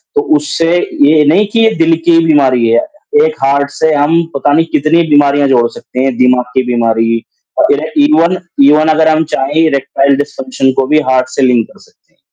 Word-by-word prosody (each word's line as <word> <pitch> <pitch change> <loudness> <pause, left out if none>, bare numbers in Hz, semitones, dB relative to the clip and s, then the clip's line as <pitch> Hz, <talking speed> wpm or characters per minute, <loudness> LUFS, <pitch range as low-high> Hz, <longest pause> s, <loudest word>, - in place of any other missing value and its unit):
तो 430 - +2 0.2
उससे 170 - -2 0.3
ये 150 0 +3
नहीं 185 +8 +2
कि 230 - +1
ये 225 0 +2
दिल 165 0 +2
की 170 -1 +3
बीमारी 130 -7 +2
है, 115 +1 +2 0.5
एक 470 -1 -3
हार्ट 140 +1 0
से 160 +1 -1
हम 155 +4 +1
पता 145 +1 0
नहीं 165 +2 +2
कितनी 155 +3 +1
बीमारियाँ 145 -1 +2
जोड़ 120 -3 +2
सकते 125 - -9
हैं, 135 -3 -2
दिमाग 125 0 +2
की 130 - +1
बीमारी 115 0 -1 0.4
और - - +2
ये - - -4
इवन 185 - +2 0.3
इवन 155 +2 +3
अगर 155 0 +2
हम 160 0 +1
चाहें 135 +2 -2
इरेक्टाइल 140 -2 0
डिस्फंक्शन 150 - -3
को 135 - -1
भी 155 +1 +2
हार्ट 130 -1 +1
से - - -4
लिंक 125 -3 +1
कर - - -21
सकते - - -27
हैं, - - -44
145 Hz, 200 wpm, -11 LUFS, 130-165 Hz, 0.5 s, ये